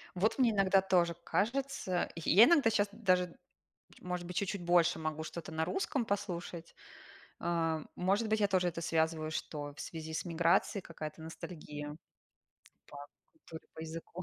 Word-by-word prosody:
Вот 210 +7 +1
мне 250 -3 +4
иногда 195 -2 +4
тоже 180 -3 +2
кажется. 235 -5 0
Й 165 - -3
я 205 +6 +9
иногда 295 -7 +5
щас 205 -2 +2
даже, 185 -5 +1 0.6
может 180 -1 -4
быть, 180 0 -6
чуть-чуть 200 -1 -1
больше 175 0 +4
могу 155 0 -3
что-то 165 0 -7
на 160 0 0
русском 290 -10 -1
послушать. 175 -5 -4 0.6
А, 165 -2 0
может 195 +5 +1
быть, 220 0 +2
я 205 - +4
тоже 185 -2 +2
это 170 0 -6
связываю, 160 -1 0
что 145 -2 -4
в - - -7
связи 160 -1 -6
с 160 - -2
миграцией 170 +3 +2
какая-то 160 -2 -8
ностальгия 150 -2 -7 0.9
по 145 - -11 0.3
культуре, 165 - -12
по - - -8
языку. 165 +2 -7
175 Hz, 155 wpm, -33 LUFS, 160-200 Hz, 0.9 s, я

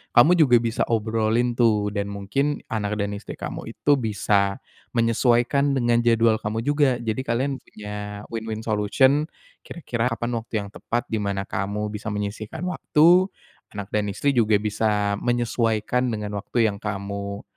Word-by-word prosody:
kamu 120 +8 +7
juga 135 -6 +6
bisa 115 0 -1
obrolin 115 +1 +1
tuh 105 -3 +3
dan 100 -1 -2
mungkin 100 +9 -2
anak 105 -1 -1
dan 100 - -3
istri 100 0 -7
kamu - - -6
itu 145 -1 +1
bisa 100 -3 0 0.3
menyesuaikan 120 +4 +2
dengan 120 -2 +2
jadwal 115 -2 +3
kamu 110 +2 -3
juga. 145 -1 +2
Jadi 120 -1 -3
kalian 130 +4 0
punya 105 -2 -8
win-win 110 -1 -4
solution 130 +8 +2 0.3
kira-kira 125 -8 -3
kapan 120 -1 -2
waktu 115 - -16
yang 100 - -9
tepat 120 +3 -3
di 110 - 0
mana 100 -1 -2
kamu 105 +2 -3
bisa 105 +1 -6
menyisihkan 105 - -4
waktu, 180 0 +4 0.5
anak 100 -1 -6
dan 105 -1 0
istri 140 +8 0
juga 110 -4 +3
bisa 105 -1 0
menyesuaikan 120 0 0
dengan 105 -3 -3
waktu 115 +2 +1
yang 100 - -9
kamu, 100 0 -4
110 Hz, 150 wpm, -24 LUFS, 105-120 Hz, 0.5 s, kamu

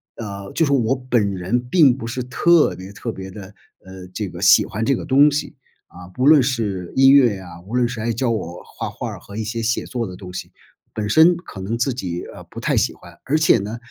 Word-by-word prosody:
呃， 100 -3 -7
就 165 - +2
是 140 - -1
我 130 -2 +2
本 120 -6 0
人 95 +6 -1
并 145 -8 +5
不 115 -3 -7
是 125 +2 -4
特 165 +6 +3
别 95 +2 -10
特 115 +3 -5
别 95 -2 -8
地， 100 +2 -10 0.4
呃， 95 -1 -11
这 105 -1 -4
个 - - -10
喜 - - +6
欢 110 +2 -4
这 135 - +2
个 - - -6
东 140 +3 +5
西， 150 0 -3 0.3
啊， 90 0 -13
不 125 - -1
论 150 -1 +7
是 110 -8 -2
音 135 0 +6
乐 130 -6 +5
呀， 90 -3 -11
无 110 +5 -6
论 125 -1 +2
是 120 -1 -6
还 115 +2 -1
教 120 +1 0
我 90 -5 -5
画 - - -6
画 - - -6
儿 - - -8
和 100 - -13
一 110 - -3
些 115 +2 -4
写 115 +1 -1
作 120 -4 -3
的 90 - -8
东 90 -1 -10
西。 - - -7 0.4
本 105 -1 -3
身 160 - +6
可 170 - -11
能 105 +5 -3
自 120 +2 0
己， 90 -8 -5
呃， - - -11
不 - - -10
太 - - 0
喜 - - +2
欢， 85 -1 -16
而 150 +4 +1
且 155 -6 +4
呢， 105 +4 -5
115 Hz, 265 characters per minute, -20 LUFS, 95-130 Hz, 0.4 s, 论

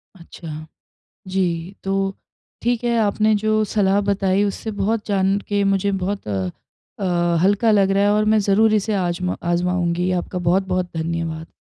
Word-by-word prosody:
अच्छा। 160 -3 -9 0.6
जी, 185 -1 -2
तो 195 0 -1 0.5
ठीक 240 0 0
है 235 -1 +1
आपने 215 0 +2
जो 215 0 +2
सलाह 200 -1 +3
बताई 195 0 +2
उससे 205 +2 -3
बहुत 220 +2 0
जान 195 -1 +1
के 205 -1 +1
मुझे 195 0 +1
बहुत 200 - -3
अ 95 -3 -1 0.5
अ, 175 -2 +1
हल्का 205 +4 +3
लग 195 -2 +3
रहा 195 +1 +2
है, 205 - +3
और 210 0 +2
मैं 215 0 +3
ज़रूर 215 +2 +4
इसे 215 +1 0
आजमा 180 -1 -1 0.2
आजमाऊँगी। 175 0 0
आपका 180 +1 -2
बहुत-बहुत 185 -1 0
धन्यवाद। 165 0 -3
195 Hz, 155 wpm, -21 LUFS, 175-205 Hz, 0.6 s, ज़रूर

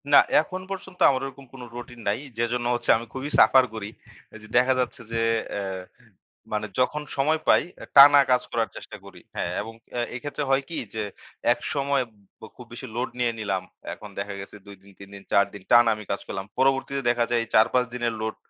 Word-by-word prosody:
না, - - +8 0.2
এখন 185 +4 -6
পর্যন্ত 190 -1 -7
আমার 130 -2 0
ওইরকম 135 0 -9
কোন 130 - -10
রুটিন 120 0 -9
নাই। 100 +3 +1 0.2
যেজন্য 120 +1 -1
হচ্ছে 120 -1 -4
আমি 115 - -7
খুবই 135 +2 -4
সাফার 130 -1 +7
করি। 105 -2 -5 0.5
এই - - -9
যে, 105 - -12
দেখা 130 +1 +5
যাচ্ছে 125 -1 -2
যে, 115 0 0 0.3
অ্যা 100 -1 -3 0.9
মানে 105 0 -1
যখন 150 +4 +1 0.2
সময় 155 +4 +2
পাই, - - +5 0.3
টানা 145 0 +10
কাজ 125 - +4
করার - - 0
চেষ্টা - - -9
করি - - -13 0.2
হ্যা - - -1 0.2
এবং 110 +2 -8 0.3
এ - - +1
এক্ষেত্রে 145 +3 -4
হয় 135 0 +3
কি 165 - -5 0.2
যে, 110 -1 -2 0.5
একসময় 140 -1 -1 0.5
খুব 125 - -11
বেশি 130 +2 -7
লোড 125 +2 -1
নিয়ে 120 -1 +2
নিলাম। 100 -4 -2 0.3
এখন 105 - -10
দেখা 100 0 -4
গেছে 100 - -11
২ 100 -1 -11
দিন 100 +1 -18
৩ 100 -1 -11
দিন 100 - -11
৪ 100 - +5
দিন 100 -2 -10
টানা 120 -1 +7
আমি 105 0 -10
কাজ 100 - -2
করলাম। 95 0 -5
পরবর্তীতে 135 +1 +2
দেখা 120 -1 +2
যায় 120 -1 +2
এই - - -10
৪-৫ 125 +3 +4
দিনের 120 -1 -1
লোড 110 0 -3
120 Hz, 200 wpm, -25 LUFS, 110-135 Hz, 0.9 s, টানা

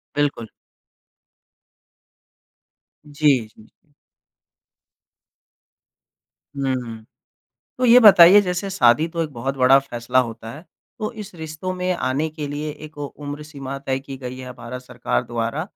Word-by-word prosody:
बिल्कुल। 145 -6 -1 2.6
जी, 150 0 +1 0.2
जी, 110 0 -19
जी। 145 +6 -29 2.6
हुँ। 125 -5 -3 0.8
तो 255 - 0
ये 245 0 +8
बताइए, 195 -3 +9
जैसे 185 0 -3
शादी 145 -3 +3
तो 165 0 -2
एक 155 - -4
बहुत 135 +3 -4
बड़ा 130 +1 +6
फ़ैसला 125 -2 -2
होता 115 -2 -2
है। 155 +6 -12 0.3
तो 215 -2 -3
इस 205 -2 -12
रिश्तों 160 +2 -6
में 180 0 -1
आने 140 +1 -1
के 150 -1 -6
लिए 150 +1 -4
एक 155 0 -12
उम्र 145 0 -7
सीमा 140 -3 -7
तय 135 -1 -2
की 135 0 -9
गई 130 -1 -7
है, 130 -1 -8
भारत 125 +1 -9
सरकार 125 -1 -2
द्वारा। 120 +6 -3
140 Hz, 130 wpm, -21 LUFS, 125-160 Hz, 2.6 s, बताइए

